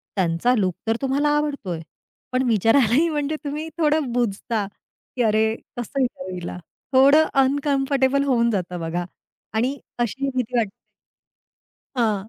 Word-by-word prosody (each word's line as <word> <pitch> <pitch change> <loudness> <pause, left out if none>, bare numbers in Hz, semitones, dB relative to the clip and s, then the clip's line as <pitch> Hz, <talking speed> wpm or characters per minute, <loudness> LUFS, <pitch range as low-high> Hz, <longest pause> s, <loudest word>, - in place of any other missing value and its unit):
त्यांचा 180 +5 +2
लूक 185 -4 +1
तर 225 - +2
तुम्हाला 275 +2 +1
आवडतोय. 280 - -2 0.5
पण 255 +1 +1
विचारायलाही 235 - +4
म्हणजे 295 -1 -1
तुम्ही 300 +2 -4
थोडं 300 -5 +2
बुजता 225 -2 -1 0.5
की 250 - -1
अरे, 220 0 +2 0.2
कसं 245 +3 -2
विचारू 255 -6 -2
हिला? 175 0 -6 0.4
थोडं 280 +4 +7 0.2
अनकम्फर्टेबल 275 0 +2
होऊन 235 -4 +2
जातं 180 -3 -2
बघा 170 +2 -2 0.5
आणि 250 +6 0 0.2
अशी 270 +4 -1
भीती 250 -1 -1
वाटते 220 -4 +1 1.3
हां, 215 -4 0
245 Hz, 125 wpm, -23 LUFS, 215-280 Hz, 1.3 s, थोडं